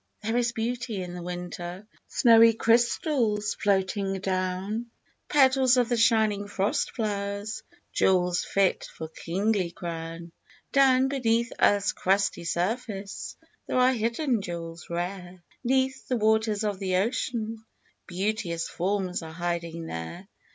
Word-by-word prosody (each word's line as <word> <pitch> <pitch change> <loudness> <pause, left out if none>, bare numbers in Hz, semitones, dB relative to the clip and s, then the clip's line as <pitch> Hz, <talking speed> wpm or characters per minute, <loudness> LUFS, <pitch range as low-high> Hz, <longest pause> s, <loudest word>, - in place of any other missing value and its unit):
There 225 +2 -1
is 240 0 +2
beauty 230 -3 -3
in 175 -1 -7
the 180 - -6
winter, 175 +2 -6 0.2
Snowy 230 -1 +6
crystals 230 - +2
floating 195 0 0
down, 190 +4 -2 0.4
Petals 265 -2 +5
of 245 -2 +2
the 240 - +2
.shining 220 -3 +3
frost 200 0 -1
flowers, 205 -1 -3 0.3
Jewels 180 -1 +2
fit 195 -2 +1
for 160 - -7
kingly 190 +3 -1
crown. 170 0 -6 0.4
Down 265 -1 +5
beneath 235 -3 +1
earth's 205 0 +4
crusty 195 -2 +1
surface 195 +3 -3 0.3
There - - -1
are 255 +1 +5
hidden 235 +1 0
jewels 170 -2 -7
rare, 180 +1 -5 0.2
'Neath 265 +1 0
the 250 - 0
waters 220 -1 +2
of 205 -3 -1
the 190 -2 -1
ocean, 225 +1 -1 0.4
Beauteous 185 -2 -2
forms 185 0 -1
are 160 -1 -8
hiding 170 -1 -3
there. 160 - -6
205 Hz, 125 wpm, -27 LUFS, 180-230 Hz, 0.4 s, Snowy